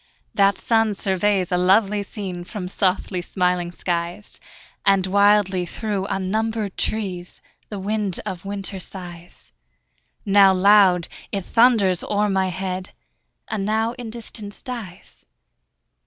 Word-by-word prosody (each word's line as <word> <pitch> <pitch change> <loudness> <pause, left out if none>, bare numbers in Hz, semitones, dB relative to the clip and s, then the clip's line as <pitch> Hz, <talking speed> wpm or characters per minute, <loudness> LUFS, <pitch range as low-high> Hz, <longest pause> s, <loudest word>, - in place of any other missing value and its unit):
That 200 0 +3
sun 225 -2 +1
surveys 190 -1 0
a 180 - +2
lovely 200 +3 +3
scene 195 -3 -5
From 185 0 -6
softly 185 -1 0
smiling 180 -1 0
skies; 175 +3 -4 0.4
And 195 -1 +3
wildly 200 -2 +3
through 205 -2 -3
unnumbered 210 +2 -2
trees 185 -5 -3 0.3
The 210 - -5
wind 200 -1 -2
of 185 0 -5
winter 200 -1 -4
sighs: 175 - -9 0.7
Now 195 -1 +6
loud, 185 -2 +5 0.2
it 195 -2 -3
thunders 225 -7 +3
o'er 210 0 0
my 190 -1 +1
head, 185 +1 -4 0.5
And 210 -3 -3
now 220 +2 0
in 245 -2 -8
distance 220 -2 -8
dies. 230 -9 -8
195 Hz, 120 wpm, -22 LUFS, 185-210 Hz, 0.7 s, Now